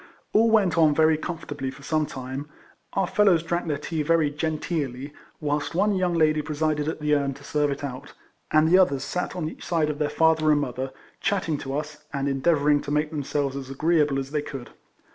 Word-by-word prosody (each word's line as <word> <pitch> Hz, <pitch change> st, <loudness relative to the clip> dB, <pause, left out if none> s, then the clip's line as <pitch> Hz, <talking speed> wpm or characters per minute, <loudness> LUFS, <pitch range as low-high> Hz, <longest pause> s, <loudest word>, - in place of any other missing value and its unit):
All 225 Hz, +2 st, +5 dB
went 195 Hz, -7 st, +3 dB
on 155 Hz, -2 st, +5 dB
very 160 Hz, 0 st, +4 dB
comfortably 150 Hz, -4 st, -5 dB
for 135 Hz, +1 st, -11 dB
some 155 Hz, +1 st, 0 dB
time; 135 Hz, +1 st, -6 dB, 0.4 s
our 195 Hz, -, +1 dB
fellows 180 Hz, -4 st, +3 dB
drank 170 Hz, +1 st, -2 dB
their 150 Hz, -2 st, 0 dB
tea 155 Hz, +2 st, -3 dB
very 155 Hz, -1 st, +2 dB
genteelly, 150 Hz, -3 st, -3 dB, 0.3 s
whilst 145 Hz, +1 st, -2 dB
one 205 Hz, +3 st, +3 dB
young 180 Hz, -2 st, +1 dB
lady 155 Hz, -2 st, +3 dB
presided 150 Hz, 0 st, -1 dB
at 160 Hz, -1 st, -3 dB
the 150 Hz, 0 st, +1 dB
urn 140 Hz, -2 st, +1 dB
to 140 Hz, -, -14 dB
serve 150 Hz, +1 st, 0 dB
it 140 Hz, 0 st, -4 dB
out, 140 Hz, 0 st, -6 dB, 0.4 s
and 155 Hz, +1 st, +4 dB
the 180 Hz, +3 st, +6 dB
others 140 Hz, -8 st, +3 dB
sat 180 Hz, -, -3 dB
on 170 Hz, -4 st, -2 dB
each 160 Hz, -, -8 dB
side 160 Hz, -3 st, +1 dB
of 145 Hz, -, -8 dB
their 150 Hz, -1 st, +1 dB
father 160 Hz, 0 st, +3 dB
and 150 Hz, -, +4 dB
mother, 130 Hz, -1 st, -3 dB, 0.3 s
chatting 180 Hz, -7 st, 0 dB
to 135 Hz, +1 st, -3 dB
us, 150 Hz, 0 st, -6 dB
and 140 Hz, -1 st, -2 dB
endeavouring 145 Hz, +1 st, +2 dB
to -, -, -7 dB
make 150 Hz, +1 st, 0 dB
themselves 145 Hz, -2 st, -2 dB
as 135 Hz, -1 st, -6 dB
agreeable 150 Hz, 0 st, +2 dB
as 135 Hz, 0 st, -4 dB
they 150 Hz, -1 st, 0 dB
could. 135 Hz, -4 st, -8 dB
150 Hz, 205 wpm, -25 LUFS, 140-160 Hz, 0.4 s, the